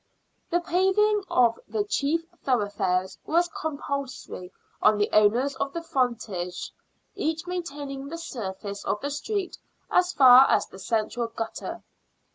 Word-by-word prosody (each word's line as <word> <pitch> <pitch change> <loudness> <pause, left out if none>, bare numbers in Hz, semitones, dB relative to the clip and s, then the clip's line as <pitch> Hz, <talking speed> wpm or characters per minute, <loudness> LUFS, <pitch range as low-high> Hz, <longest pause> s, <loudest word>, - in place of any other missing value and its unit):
The 345 +1 +1
paving 385 +4 +2
of 235 -2 +3
the 425 - -1
chief 330 -5 0 0.2
thoroughfares 200 -6 0
was 345 +2 +2
com 315 -3 -4
pulsory 270 -10 -5 0.3
on 215 0 +5
the 205 - +1
owners 230 +7 +4
of 275 - -2
the 335 - -4
frontages, 235 - -2 0.4
each 320 +2 -2
maintaining 285 -6 -5
the 330 +4 -6
surface 200 - -6
of 210 - -1
the 285 - -3
street 390 +6 -3 0.3
as 360 0 +3
far 260 -3 +8
as - - +3
the 190 - -13
central 225 +3 -1
gutter. 225 0 -6
275 Hz, 135 wpm, -26 LUFS, 215-335 Hz, 0.4 s, far